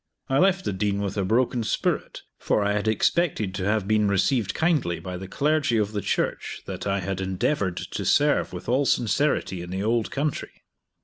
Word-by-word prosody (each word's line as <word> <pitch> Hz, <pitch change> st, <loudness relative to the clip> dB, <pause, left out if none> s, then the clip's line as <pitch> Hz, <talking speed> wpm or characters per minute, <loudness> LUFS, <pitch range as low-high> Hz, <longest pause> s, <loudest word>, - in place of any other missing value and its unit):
I 135 Hz, +1 st, +2 dB
left 190 Hz, +1 st, +3 dB
the -, -, -1 dB
Dean 100 Hz, +1 st, -1 dB
with 100 Hz, -1 st, -3 dB
a 100 Hz, -, 0 dB
broken 120 Hz, +4 st, +1 dB
spirit, -, -, -2 dB, 0.2 s
for 105 Hz, -, +1 dB
I 100 Hz, -, +1 dB
had 105 Hz, +1 st, -1 dB
expected 110 Hz, -, +1 dB
to 95 Hz, -1 st, -3 dB
have 105 Hz, -1 st, 0 dB
been 105 Hz, -1 st, +3 dB
received 100 Hz, +3 st, +1 dB
kindly 150 Hz, -, +1 dB
by 90 Hz, -1 st, -6 dB
the 95 Hz, +1 st, -7 dB
clergy 145 Hz, +2 st, +1 dB
of 105 Hz, -1 st, 0 dB
the 105 Hz, -1 st, -2 dB
church -, -, -2 dB
that -, -, -5 dB
I 100 Hz, 0 st, 0 dB
had 95 Hz, +1 st, -3 dB
endeavored 95 Hz, -, -1 dB
to -, -, -4 dB
serve -, -, +2 dB
with -, -, -8 dB
all 130 Hz, +4 st, +2 dB
sincerity 120 Hz, -6 st, +1 dB
in 90 Hz, -, -8 dB
the 95 Hz, +2 st, -3 dB
old 115 Hz, +1 st, +1 dB
country. 145 Hz, 0 st, -3 dB
105 Hz, 195 wpm, -25 LUFS, 95-130 Hz, 0.2 s, left